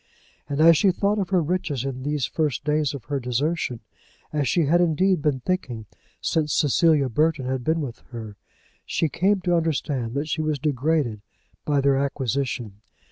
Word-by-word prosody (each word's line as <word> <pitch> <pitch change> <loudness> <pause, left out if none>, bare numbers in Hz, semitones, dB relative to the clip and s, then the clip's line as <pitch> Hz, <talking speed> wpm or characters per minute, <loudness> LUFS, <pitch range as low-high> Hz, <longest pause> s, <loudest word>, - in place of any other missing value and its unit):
And 140 0 -2
as 165 0 +7
she 200 - +4
thought 200 +3 +1
of 190 -3 -2
her 185 -3 +2
riches 155 -6 -2
in 130 -2 -4
these 145 0 -1
first 150 -6 -1
days 150 -1 0
of 135 - -8
her 145 -2 -2
desertion, 125 +1 -1 0.5
as 145 -3 0
she 160 +6 +2
had 170 +5 +3
indeed 175 +1 +2
been 140 -3 0
thinking 125 - -3 0.3
since 155 -2 0
Cecilia 150 -1 +3
Burton 150 +2 +1
had 130 -1 -2
been 160 +4 +1
with 125 -6 -6
her, 110 -4 -8 0.5
she 165 - 0
came 195 +6 +1
to 175 -1 +1
understand 140 -7 -1
that 145 +2 -1
she 155 0 -1
was 155 -1 0
degraded 140 -5 0 0.4
by 145 -2 +2
their 140 0 +3
acquisition. 130 -6 -2
145 Hz, 175 wpm, -24 LUFS, 130-165 Hz, 0.5 s, as